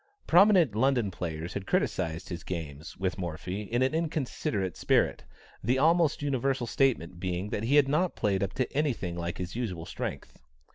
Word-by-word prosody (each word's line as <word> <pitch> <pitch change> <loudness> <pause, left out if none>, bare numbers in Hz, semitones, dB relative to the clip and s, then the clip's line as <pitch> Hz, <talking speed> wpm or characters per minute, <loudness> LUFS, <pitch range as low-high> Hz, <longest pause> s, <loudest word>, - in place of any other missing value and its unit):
Prominent 180 - +6
London 120 -2 +2
players 85 -1 -5
had 100 -1 -5
criticized 80 +2 -1
his 85 -2 -5
games 80 -3 -6
with 95 0 -2
Morphy 90 +3 -4
in 120 +5 0
an 130 - +1
inconsiderate 135 - -1
spirit, - - +1 0.4
the 125 +5 +2
almost 160 +1 +3
universal 135 -2 0
statement 110 -10 +1
being 90 +3 -3
that 105 - -2
he 135 +5 +3
had 145 -2 +6
not 165 +6 +1
played 100 -2 0
up 100 0 -1
to 130 - -2
any 145 -1 +2
thing 90 -6 -5
like 85 0 -4
his 90 +1 -5
usual 95 -9 -3
strength. 85 - -6
105 Hz, 175 wpm, -29 LUFS, 90-135 Hz, 0.4 s, Prominent